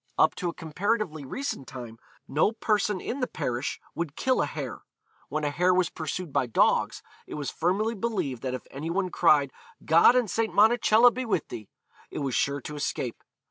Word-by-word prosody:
Up - - +4
to 180 - -1
a - - -5
comparatively 165 -1 -2
recent 200 - -4
time, 120 -3 -9 0.3
no 155 +10 +2
person 210 -3 0
in 255 - -4
the 250 - 0
parish 125 -3 -3
would 165 -4 -4
kill 260 0 +1
a - - 0
hare. - - -6 0.5
When 155 0 -2
a 145 - 0
hare 180 +5 +3
was 180 -2 +2
pursued 160 0 -5
by 125 - +1
dogs, 115 - +2 0.2
it - - -7
was 145 -2 -3
firmly 200 +7 0
believed 190 - -2
that 130 -1 -2
if 130 - -8
any 145 +4 -5
one 185 +1 -1
cried, 145 -6 +3 0.3
'God 165 +9 +6
and 250 -3 +3
St. 225 +3 -1
Monacella 225 +2 +6
be 255 - -3
with 210 - -1
thee,' 110 -4 -8 0.4
it - - -8
was 135 -3 -2
sure 140 0 0
to 150 - -7
escape. 135 -5 -3
170 Hz, 190 wpm, -27 LUFS, 140-215 Hz, 0.5 s, God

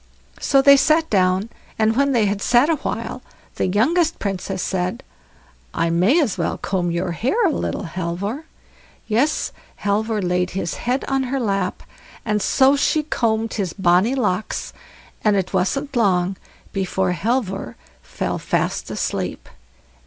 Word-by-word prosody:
So 270 -1 +3
they 280 0 +8
sat 315 +3 +3
down 185 -2 +3
there, 220 - -9 0.3
and 220 0 +2
when 280 +2 +2
they 235 -5 +3
had 200 0 -1
sat 245 +9 +4
a 320 - +1
while, - - -4 0.4
the - - +1
youngest 310 - +2
Princess 195 -1 -3
said: 180 -1 -2 0.7
"I 165 0 +1
may 190 - +4
as 225 - 0
well 170 - -1
comb 180 -3 -1
your 170 +1 -1
hair 265 - +1
a 345 - +3
little, 285 - -2
Halvor." 185 - -4 0.6
Yes, 245 +8 +1 0.3
Halvor 215 +2 0
laid 180 -1 0
his 170 -3 -2
head 250 +3 -2
on 270 -1 0
her 270 +1 -1
lap, 200 -5 -1 0.4
and 210 -2 0
so 265 +6 +4
she 305 +2 +1
combed 225 -6 0
his 195 -5 -2
bonny 190 +6 +3
locks, 210 -5 -2 0.5
and 210 -1 +3
it 190 -1 -1
wasn't 275 +10 -1
long 190 -5 +2 0.4
before 190 -1 0
Halvor 195 - -2 0.3
fell - - -3
fast - - -1
asleep. - - -3
210 Hz, 150 wpm, -21 LUFS, 185-265 Hz, 0.7 s, they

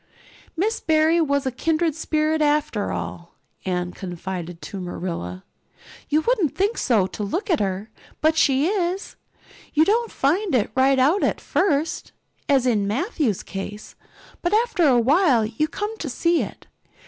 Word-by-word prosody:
"Miss 435 +6 0
Barry 315 +1 +3
was 280 -3 +1
a 260 - 0
kindred 320 +5 0
spirit, 310 0 0
after 295 -8 +1
all," 170 0 -6 0.3
Anne 180 -1 -1
confided 175 -2 -6
to 200 - -6
Marilla. 170 - -5 0.7
"You 305 +2 +3
wouldn't 400 - +1
think 405 +4 0
so 220 -7 +3
to 190 - -7
look 350 - -2
at 330 - +3
her, 195 +2 -2 0.3
but 315 +1 +3
she 275 -3 +3
is. 370 0 -1 0.6
You 310 +1 +5
don't 460 +4 +1
find 335 +4 +1
it 220 -4 +1
right 265 +1 +4
out 295 +10 +3
at - - +1
first, 315 -4 0 0.4
as 270 -3 +4
in 210 -5 +2
Matthew's 260 - -1
case, 205 +2 -7 0.5
but 350 +4 +1
after 440 -7 +2
a 250 -3 +5
while 265 - +4
you 235 +8 -1
come 415 +7 -4
to 305 - -4
see 335 +6 +1
it. - - -7
285 Hz, 155 wpm, -23 LUFS, 210-340 Hz, 0.7 s, You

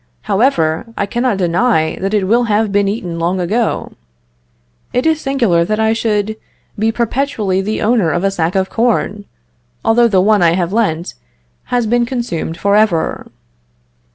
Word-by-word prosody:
However, 190 - +1
I 200 - 0
cannot 240 +1 -1
deny 175 -2 +1
that 195 +3 -2
it 205 - +1
will 235 +5 +2
have 215 -1 +1
been 200 0 +2
eaten 185 -5 -3
long 175 +3 0
ago. 215 +7 -1 1.0
It 250 +3 0
is 320 -1 +2
singular 235 -12 +1
that 215 +5 -2
I 220 0 +2
should 220 -1 -1 0.4
be 220 +1 +2
perpetually 230 -5 -1
the 215 +3 -2
owner 215 -6 +2
of 175 +3 -1
a 195 - +2
sack 175 -1 -1
of 190 0 +1
corn, 215 -3 -1 0.6
although 235 +1 +4
the 195 -5 +2
one 205 +1 +3
I 170 -1 +4
have 180 +1 -1
lent 180 -7 -1 0.5
has 245 -2 0
been 240 +2 +1
consumed 230 -10 -3
for 200 0 +1
ever. 210 -7 +1
210 Hz, 160 wpm, -16 LUFS, 185-235 Hz, 1.0 s, although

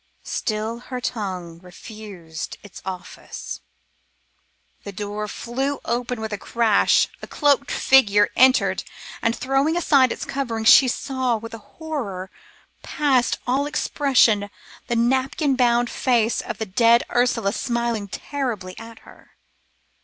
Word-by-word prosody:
Still 220 +2 -3
her 250 +1 -6
tongue 185 -8 -4
refused 180 -3 -9
its 205 - -12
office. 185 -2 -7 1.2
The 200 - -7
door 205 +1 -5
flew 265 +6 -3
open 245 0 -2
with 220 -1 -4
a 205 - -4
crash, 230 -3 +3
a - - -8
cloaked 285 -1 +2
figure 205 -6 +4
entered 260 +1 +4 0.4
and, 230 +1 +1
throwing 270 +5 +1
aside 280 -6 +4
its - - -4
coverings, 230 -5 0
she 265 - +8
saw 255 -1 -1
with 230 +1 -9
a 225 - -7 0.2
horror 230 - -5 0.5
past 270 -5 +1
all 270 +4 +1
expression 250 -8 +2 0.4
the 240 - -1
napkin 265 +4 +1
bound 240 -1 +3
face 235 -2 +1
of - - -6
the 220 - -3
dead 230 +4 +4
Ursula 235 -4 +1
smiling 235 -4 -2
terribly 225 -6 -4
at 225 0 -11
her. - - -18
235 Hz, 125 wpm, -22 LUFS, 210-260 Hz, 1.2 s, she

